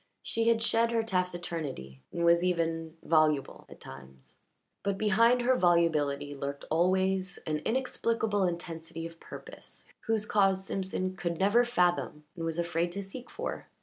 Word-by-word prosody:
She 230 -1 0
had 230 -1 +3
shed 230 0 +3
her 230 -1 +1
taciturnity 175 - -3
and 170 0 -1
was 170 +1 +5
even 165 -2 -1
voluble 155 -3 +1
at - - -13
times. 65 0 -13 0.5
But 200 -1 -1
behind 230 +4 +4
her 255 +1 +4
volubility 155 - +2
lurked 140 0 -5
always 185 +2 +1
an 155 -1 -1
inexplicable 225 -2 0
intensity 165 -1 -5
of 165 0 -9
purpose - - -10 0.2
whose 220 -2 +1
cause 195 -2 +2
Simpson 185 -1 -3
could 170 -2 -3
never 205 +6 +4
fathom 175 -8 0
and 165 - -5
was 165 0 -2
afraid 170 0 0
to 200 +1 -4
seek 235 +6 -9
for. - - -5
175 Hz, 150 wpm, -30 LUFS, 165-200 Hz, 0.5 s, was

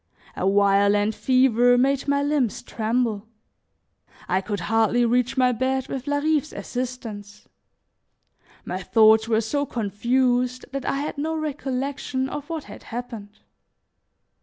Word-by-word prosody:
A 190 - +1
violent 200 +1 +3
fever 245 -1 +3
made 270 +2 +1
my 280 0 +1
limbs 285 -6 0
tremble; 225 -1 -1 1.0
I 185 +1 +1
could 200 -1 -4
hardly 225 +4 +2
reach 245 +2 +1
my 255 -1 +4
bed 260 +2 -1
with 270 +1 -5
Larive's 300 +1 0
assistance. 225 -5 -6 1.2
My 185 +2 -4
thoughts 220 +2 +4
were 225 -1 +2
so 285 +6 -1
confused 245 +4 0
that 275 -2 -4
I - - 0
had 295 -1 -4
no 320 +2 -1
recollection 270 -3 -3
of 295 +2 -6
what 325 -3 -4
had 205 - -11
happened. 225 -3 -7
245 Hz, 125 wpm, -24 LUFS, 215-270 Hz, 1.2 s, my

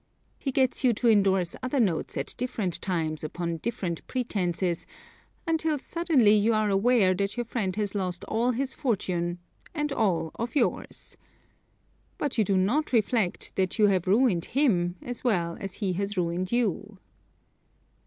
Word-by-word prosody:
He 270 - -2
gets 260 0 +1
you 250 -2 +5
to 235 +2 +1
endorse 195 -4 +3
other 255 +2 -1
notes 190 -9 0
at 135 - -3
different 225 -8 -2
times 160 -5 -1
upon 170 +2 -3
different 180 -4 -4
pretenses 185 -8 -1 0.6
until 320 -2 +1
suddenly 285 -8 +3
you 215 +2 +3
are 215 -1 +1
aware 200 -1 +4
that 200 +4 -2
your 240 - 0
friend 215 -5 -2
has 205 -2 -2
lost 185 -3 -3
all 235 +3 0
his 260 +2 -1
fortune 180 - -1 0.4
and 295 -1 -1
all 175 - 0
of 235 +4 -5
yours. 290 - -1 1.0
But 285 -5 -2
you - - +5
do 195 -1 +1
not 240 +12 +1
reflect 220 -4 0
that 190 +1 0
you 210 -2 +5
have 185 -2 +1
ruined 200 -4 +3
him 185 -11 +1
as 245 0 -5
well 175 -9 +1
as 195 -2 -5
he 195 -4 -1
has 200 +2 -3
ruined 180 +1 -1
you. 210 -3 -1
205 Hz, 155 wpm, -27 LUFS, 180-245 Hz, 1.0 s, you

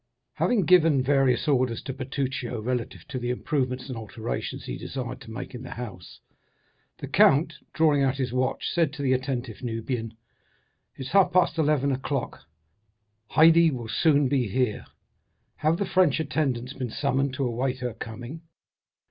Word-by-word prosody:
Having 185 +6 +1
given 165 -6 +5
various 135 -1 +2
orders 130 -5 +2
to 135 - -4
Bertuccio 130 -2 -3
relative 120 +1 -4
to 130 - -3
the 120 0 -3
improvements 130 0 -2
and 130 - -5
alterations 110 +1 -5
he - - -4
desired 130 -2 -6
to 115 - -11
make 125 +4 -7
in 125 - -7
the 125 - -8
house, 105 -7 -9 0.8
the - - -7
Count, 145 +5 +4 0.2
drawing 155 -3 +3
out 135 -1 +2
his 130 -3 -2
watch, 130 0 -1
said 165 -5 +1
to 145 -1 -5
the 130 -1 +3
attentive 130 -1 -3
Nubian: 115 -1 -4 0.8
"It - - -10
is 130 - -5
half 195 -2 +5
past 175 -2 +2
eleven 145 -2 +2
o'clock; 135 +1 -3 0.9
Haydée 165 +1 +6
will 120 -4 -5
soon 145 +4 +3
be 130 -3 +1
here. 115 +1 -1 0.7
Have 155 +2 +1
the 200 - -1
French 185 -2 +3
attendants 135 -4 -1
been 130 -3 -4
summoned 135 +4 0
to 135 -1 -1
await 125 +2 -1
her 125 -2 -2
coming?" 120 +7 -8
130 Hz, 160 wpm, -26 LUFS, 125-145 Hz, 0.9 s, Haydée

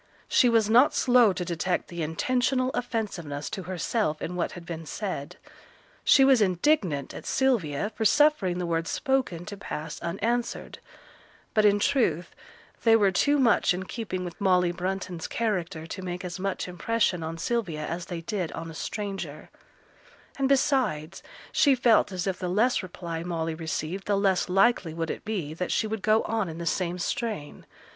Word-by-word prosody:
She 250 - +4
was 225 -3 +3
not 240 +6 +5
slow 245 -4 +5
to 180 -1 -4
detect 175 +1 -1
the 170 -1 -6
intentional 255 - 0
offensiveness 190 - -3
to 195 - -4
herself 185 -2 -1
in 180 - -4
what 175 - -2
had 175 -1 -10
been 165 -1 -6
said; 185 -9 -4 0.7
she 270 - +6
was 265 -4 +5
indignant 185 - +1
at - - -9
Sylvia 210 - +1
for 220 - -3
suffering 255 -8 +3
the 180 - -2
words 165 -1 -1
spoken 260 - -1
to 205 - -6
pass 160 -5 -6
unanswered; 230 +7 -2 0.7
but 215 -1 +3
in 205 0 +5
truth 205 - +1 0.5
they 225 -1 +5
were 205 -3 +4
too 285 +11 +3
much 240 -8 +3
in 185 - -4
keeping 185 -3 -4
with 175 - -8
Molly 180 -2 +3
Brunton's 185 -1 -4
character 185 -7 -2
to 185 +3 -7
make 180 0 -5
as 180 +1 -5
much 195 -1 -2
impression 180 0 0
on 160 +1 -4
Sylvia 170 -6 -2
as 170 +2 -4
they 175 -3 -5
did 180 -1 -3
on 165 0 -6
a - - -10
stranger; 190 -5 -5 0.9
and 270 -1 +2
besides, 250 - +1 0.3
she 280 -3 +4
felt 235 -4 +4
as 185 -1 -3
if 190 -2 -2
the 180 - -3
less 225 +7 +2
reply 170 -3 -6
Molly 165 -2 -2
received, 160 +3 -4
the 205 -1 +2
less 195 -2 +1
likely 190 -4 +3
would 165 -1 -2
it - - -7
be 185 -9 -3
that 180 +3 -3
she - - +1
would 215 -1 -3
go 215 +2 +3
on 220 -5 -1
in 160 - -7
the 170 - -5
same 175 0 -1
strain. 205 -5 -4
185 Hz, 175 wpm, -27 LUFS, 170-225 Hz, 0.9 s, she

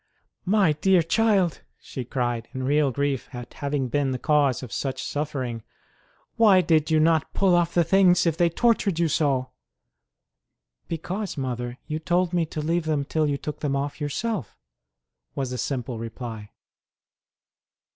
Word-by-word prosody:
My 195 -5 +4
dear 180 +3 +3
child! 195 -3 +2 0.2
she 130 - -7
cried, 120 -2 -2
in 130 - -3
real 145 +1 +2
grief 140 0 -2
at 120 -1 -8
having 140 -2 -2
been 140 +2 0
the 130 - -1
cause 145 -2 +2
of 120 - -8
such 135 -1 -3
suffering, 135 -6 -3 0.8
why 205 -5 +6
did 160 -3 +2
you 160 -1 +3
not 160 0 +2
pull 195 -2 +3
off 175 -1 +1
the 175 - +5
things 180 0 +4
if 165 -2 +2
they 170 0 +3
tortured 210 -2 +1
you 170 0 +2
so? 140 -5 0 1.4
Because, 185 +4 -4
mother, 125 -2 -3
you 155 0 -3
told 175 +2 0
me 170 -2 +1
to 155 - -5
leave 165 +2 0
them 150 -3 0
till 155 +1 0
you 140 -1 0
took 150 +1 -6
them 140 -2 -1
off 140 +2 -3
yourself, 145 - -3 0.8
was 135 -2 -2
the 125 - -4
simple 125 -4 -3
reply. 115 -2 -7
150 Hz, 155 wpm, -25 LUFS, 130-170 Hz, 1.4 s, why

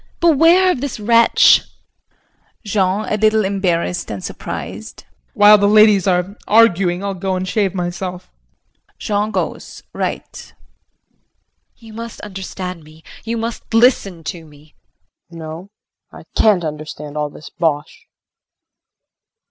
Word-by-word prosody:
Beware 340 +3 +4
of 260 - -3
this 280 -5 -4
wretch. 230 +2 +5 1.0
JEAN 200 0 0
[A 215 - -1
little 215 0 +2
embarrassed 180 -3 -1
and 100 -3 -6
surprised]. - - -7 0.3
While 210 0 +7
the 200 - +3
ladies 210 -2 +5
are 180 +2 0
arguing 195 -4 +3
I'll 200 -1 -2
go 190 0 -3
and 185 0 -3
shave 195 -1 0
myself. 180 0 -5 0.7
[Jean 205 +1 -1
goes, - - -5
R.] - - -7 0.2
JULIE. - - -24 1.5
You 225 -2 -15
must 230 +1 -8
understand 185 -3 -7
me 155 +1 -18 0.2
you 230 +1 -2
must 230 +1 -5
listen 205 -8 +2
to 165 +2 -6
me. 150 0 -19 0.6
KRISTIN. 170 - -12
No 160 +4 -8 0.4
I - - -12
can't 205 -5 +3
understand 150 -1 -7
all 150 -1 -2
this 150 - -13
bosh. 165 - -3
195 Hz, 125 wpm, -18 LUFS, 175-215 Hz, 1.5 s, While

